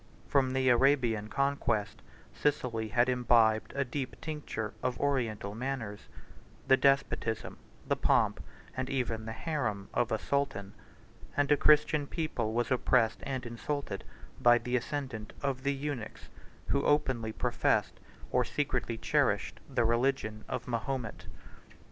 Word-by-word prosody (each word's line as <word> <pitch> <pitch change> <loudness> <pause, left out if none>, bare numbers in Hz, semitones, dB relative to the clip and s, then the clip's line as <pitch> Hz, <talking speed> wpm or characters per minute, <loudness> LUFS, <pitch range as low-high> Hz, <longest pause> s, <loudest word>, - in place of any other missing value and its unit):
From 130 -2 +2
the 130 0 +1
Arabian 120 -4 +3
conquest, 115 - 0 0.3
Sicily 125 -6 0
had 120 +3 +3
imbibed 120 -3 +3
a 140 0 +1
deep 130 +1 -4
tincture 145 -9 -4
of 125 -1 -1
Oriental 115 -8 -1
manners; 115 -3 -4 0.6
the 130 - +7
despotism, 135 -5 +1 0.3
the - - +2
pomp, - - +2 0.3
and 130 0 -2
even 115 -5 -2
the 110 - -4
harem, 110 - -2
of 120 - +1
a 110 - +2
sultan; 100 -3 -2 0.6
and 145 0 +2
a - - +8
Christian 150 0 +4
people 135 -9 -2
was 120 +3 0
oppressed 125 -3 +3
and 130 -2 -3
insulted 120 -2 -4 0.4
by 120 0 +7
the 125 +1 -2
ascendant 125 -5 -3
of 135 -2 -1
the 140 +1 +1
eunuchs, 135 -5 -5 0.4
who 140 - +2
openly 135 -7 +1
professed, - - 0 0.3
or - - +3
secretly - - -2
cherished, - - +1
the 120 - +1
religion 115 -2 0
of - - -4
Mahomet. 120 -1 -3
125 Hz, 130 wpm, -31 LUFS, 110-140 Hz, 0.6 s, a